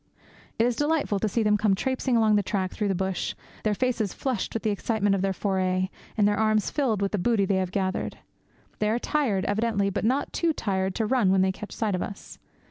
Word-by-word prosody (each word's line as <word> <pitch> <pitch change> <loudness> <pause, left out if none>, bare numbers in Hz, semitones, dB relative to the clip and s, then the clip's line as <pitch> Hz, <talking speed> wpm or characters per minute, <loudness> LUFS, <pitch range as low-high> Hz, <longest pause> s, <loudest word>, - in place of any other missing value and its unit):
It 225 - +3
is 245 -1 +1
delightful 295 -7 +1
to 215 - 0
see 225 +3 0
them 210 0 +3
come 205 -2 +2
traipsing 260 +2 0
along 220 -2 +4
the 205 - +4
track 190 -2 -2
through 210 - -2
the 195 - +1
bush, 190 0 -2 0.3
their 215 -1 +1
faces 235 -4 -1
flushed 255 -7 -2
with 225 - -2
the 215 - +1
excitement 205 0 0
of 195 - 0
their 195 0 +1
foray, 185 -1 0 0.3
and 205 -1 +4
their 205 0 +1
arms 215 -1 +2
filled 230 -9 0
with 195 - 0
the 205 - -1
booty 215 0 +2
they 195 0 +1
have 185 -1 0
gathered. 190 0 -2 0.6
They 210 - +1
are 225 - +2
tired, 240 -8 0
evidently, 205 -1 +1
but - - -2
not 260 +6 0
too 335 -2 +1
tired 190 -6 -1
to 225 - 0
run 215 -4 +3
when 190 -1 +4
they 190 - +2
catch 210 +2 -9
sight 215 -3 -1
of 180 - -1
us. 200 - -7
210 Hz, 230 wpm, -26 LUFS, 195-230 Hz, 0.6 s, along